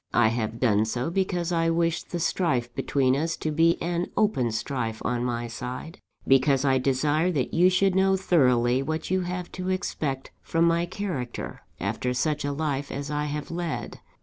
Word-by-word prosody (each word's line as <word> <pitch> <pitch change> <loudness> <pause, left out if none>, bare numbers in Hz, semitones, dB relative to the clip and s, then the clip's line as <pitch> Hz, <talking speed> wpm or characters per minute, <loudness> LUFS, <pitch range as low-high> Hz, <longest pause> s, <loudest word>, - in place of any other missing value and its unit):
I 110 -2 +5
have 115 0 -2
done 110 -4 +3
so, 120 +7 -2
because 180 -2 0
I 165 -1 +2
wish 165 0 +1
the 175 - -5
strife 130 -8 0
between 130 0 +1
us 160 +4 -1
to 155 - -2
be 165 +2 +3
an 175 +1 -1
open 170 - +2
strife 115 -1 -3
on 120 -1 0
my 120 -1 -2
side; 125 +7 -6 0.3
because 135 +1 +4
I 135 -1 +3
desire 145 +6 +1
that 135 -5 -1
you 180 +2 +5
should 190 +1 +3
know 190 0 +3
thoroughly 125 -9 +3
what 160 +5 -3
you 185 0 +2
have 180 0 -4
to 185 0 -4
expect 155 -8 -2
from 165 0 +1
my 170 +1 +2
character, 175 -10 -5 0.2
after 125 0 -2
such 150 +3 0
a 145 - -1
life 140 -1 -2
as 140 +2 -4
I 150 0 -1
have 150 +1 -4
led. 170 -1 -4
150 Hz, 180 wpm, -26 LUFS, 125-170 Hz, 0.3 s, I